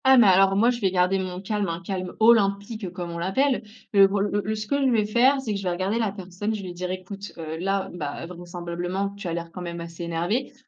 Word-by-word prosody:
Ah 265 0 +7
mais 235 - +8
alors, 195 +1 +5
moi, 230 +5 +4
je 240 -1 -5
vais 195 - +3
garder 185 +1 +2
mon 185 -1 -4
calme, 205 0 -1
un 165 0 -3
calme 185 0 -4
olympique 205 -2 +3
comme 175 -1 -5
on 170 - -5
l'appelle, 255 +10 +1 0.3
le 195 -1 +8
bro 200 +1 -1
le 205 0 0
le 215 +1 -1
ce 215 0 -4
que 280 +6 0
je 265 - +4
vais 220 -4 +3
faire, 250 +6 +4
c'est 235 -5 -3
que - - -1
je - - -7
vais 185 - 0
regarder 190 +6 -1
la 220 -4 +1
personne, 195 +2 -4
je 210 - -5
vais 185 - -6
lui - - -6
dire: 180 +1 -4
«Écoute, 195 +2 -7
heu, 160 -1 -5
là, 195 +1 0
bah, 150 -2 -5
vraisemblablement, 175 +2 -4
tu 200 -2 -6
as 170 - -2
l'air 170 0 -4
quand 180 - -8
même 170 -1 -5
assez 170 0 -8
énervé, 175 +11 -1
195 Hz, 265 wpm, -25 LUFS, 175-210 Hz, 0.3 s, mais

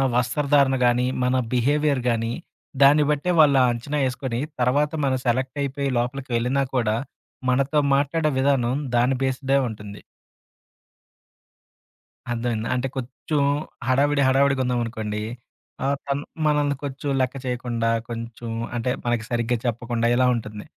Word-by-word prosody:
వస్త్రధారణ 135 +2 +2
కానీ, 120 +1 +3 0.2
మన 125 +1 +2 0.2
బిహేవియర్ 140 +2 +2
కానీ, 115 0 0 0.5
దాన్ని 145 +2 +6
బట్టే 150 +5 0
వాళ్ళు 140 -3 +6
అంచనా 125 +5 -3
ఏసుకొని 125 -2 -3 0.2
తర్వాత 145 +4 +2
మనం 130 -1 +1
సెలెక్ట్ 130 +4 0
అయిపోయి 140 0 -2
లోపలికి 125 +2 -2
వెళ్ళినా 125 +4 +1
కూడా 110 -3 +1 0.5
మనతో 140 +4 +2 0.2
మాట్లాడే 155 +3 +1
విధానం 130 -2 +2 0.2
దాని 125 +2 +3
బేస్డే 135 +1 +1
ఉంటుంది. 105 -2 -8 2.3
అర్థమైందా? 115 -1 -2
అంటే, 125 - -1
కొంచెం 135 +4 -3 0.5
హడావిడి, 140 +2 +3
హడావిడిగా 135 0 +3
ఉన్నాం 125 -1 0
అనుకోండి, 105 -2 -4 0.6
ఆహ్, 140 +1 +1
తను 140 +1 -2 0.2
మనల్ని 145 -2 +2
కొంచెం 140 +1 -4
లెక్క 130 +1 0
చేయకుండా, 120 -2 -1 0.2
కొంచెం 115 0 -6 0.3
అంటే 120 +2 -1 0.2
మనకు 120 -1 0
సరిగ్గా 120 0 0
చెప్పకుండా, 120 0 -1
ఇలా 130 0 +4
ఉంటుంది. 105 -2 -6
130 Hz, 125 wpm, -23 LUFS, 120-140 Hz, 2.3 s, దాన్ని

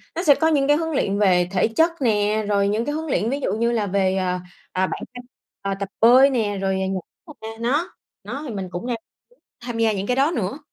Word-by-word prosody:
nó 340 - -2
sẽ 290 -6 +6
có 320 - +1
những 285 -4 +2
cái 295 +1 +4
huấn 325 0 -2
luyện 200 -8 0
về 180 -4 +3
thể 185 +1 +2
chất 325 +10 +2
nè, 215 -2 +1
rồi 200 -1 +2
những 215 +3 0
cái 290 - -2
huấn 320 +1 -4
luyện 230 -6 0
ví 275 +3 -1
dụ - - -1
như 235 +1 +1
là 220 -3 0
về, 190 -1 +1
à, 180 -1 -1 0.3
à, 185 0 0
bản - - -5
thân 245 0 -9 0.4
ờ, 195 0 -2
tập 200 -1 -4
bơi 255 +4 +7
nè 215 -6 -1
rồi 190 0 0
nh 190 0 -2 0.4
a, 220 - -7
nó 280 +9 -1 0.3
nó 285 - -6
thì 235 - -5
mình 190 -2 -4
cũng 180 +7 -5
đang 245 - -1
muốn 225 - -16 0.5
tham 240 -2 -4
gia 225 -1 +3
những 200 0 -3
cái 250 - +1
đó 275 +4 +3
nữa. 220 +5 -2
225 Hz, 250 wpm, -22 LUFS, 200-275 Hz, 0.5 s, bơi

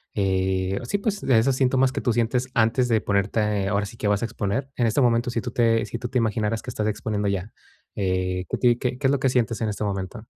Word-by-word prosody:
eh, 95 -1 0
sí, 120 - -1
pues, 205 -1 -2
de 130 -4 +3
esos 130 +4 +2
síntomas 130 0 +2
que - - -2
tú 125 - +1
sientes 120 +3 0
antes 120 +2 +2
de 115 -2 +3
ponerte, 100 0 0
ahora 100 0 0
sí 110 +3 -10
que 105 - -2
vas 100 -1 +1
a - - 0
exponer. 115 +3 -3
En 120 - +1
este 115 - +1
momento, 120 0 +2
si 115 - -1
tú 120 - -5
te 115 -2 +2
si - - -5
tú 120 -1 -5
te 130 - -1
imaginaras 110 -1 0
que - - -8
estás 105 0 -2
exponiendo 105 -1 -1
ya, 100 +2 -3 0.4
eh, 90 -1 -1
¿que - - -1
ti 120 -2 +3
que 125 0 -2
qué 135 0 +1
es - - +3
lo 140 - +1
que 130 - +2
sientes 120 -2 0
en 110 - 0
este 105 0 -4
momento? 100 +3 -4
115 Hz, 255 wpm, -24 LUFS, 100-125 Hz, 0.4 s, de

